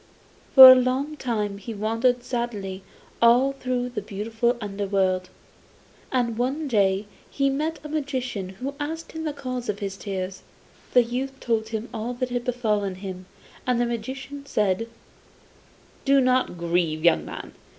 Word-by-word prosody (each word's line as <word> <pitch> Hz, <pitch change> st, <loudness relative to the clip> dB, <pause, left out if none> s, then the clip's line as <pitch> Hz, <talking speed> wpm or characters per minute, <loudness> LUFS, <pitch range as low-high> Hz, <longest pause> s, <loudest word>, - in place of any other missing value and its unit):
For 260 Hz, -1 st, +13 dB
a -, -, +12 dB
long 255 Hz, +4 st, 0 dB
time 210 Hz, -7 st, -2 dB
he 220 Hz, +2 st, -7 dB
wandered 230 Hz, +4 st, +1 dB
sadly 215 Hz, -7 st, -3 dB, 0.4 s
all 245 Hz, +3 st, +5 dB
through 255 Hz, -2 st, -2 dB
the 235 Hz, -4 st, -4 dB
beautiful 225 Hz, +4 st, -1 dB
underworld, 195 Hz, -3 st, -1 dB, 0.8 s
and 240 Hz, -3 st, 0 dB
one 275 Hz, +5 st, -1 dB
day 200 Hz, -4 st, +2 dB, 0.2 s
he 275 Hz, -1 st, +1 dB
met 310 Hz, +4 st, -1 dB
a -, -, -6 dB
magician 260 Hz, -10 st, -3 dB
who 250 Hz, +9 st, -6 dB
asked 320 Hz, +3 st, -4 dB
him 320 Hz, 0 st, -5 dB
the 305 Hz, -, -1 dB
cause 255 Hz, -4 st, -5 dB
of 205 Hz, -, -1 dB
his 195 Hz, -2 st, -5 dB
tears. 190 Hz, -2 st, -5 dB, 0.5 s
The 245 Hz, -, +7 dB
youth 265 Hz, +3 st, -4 dB
told 225 Hz, -2 st, 0 dB
him 220 Hz, +1 st, -4 dB
all 235 Hz, +3 st, -3 dB
that 255 Hz, +1 st, -2 dB
had 245 Hz, -1 st, -2 dB
befallen 210 Hz, -6 st, 0 dB
him, 185 Hz, -1 st, -8 dB, 0.4 s
and 250 Hz, -1 st, +2 dB
the 240 Hz, -, +2 dB
magician 265 Hz, +4 st, -5 dB
said: 210 Hz, 0 st, 0 dB, 1.2 s
'Do 275 Hz, 0 st, +4 dB
not 255 Hz, -7 st, +2 dB
grieve, 170 Hz, -2 st, 0 dB
young 170 Hz, -, +5 dB
man! -, -, -8 dB
235 Hz, 150 wpm, -25 LUFS, 200-260 Hz, 1.2 s, For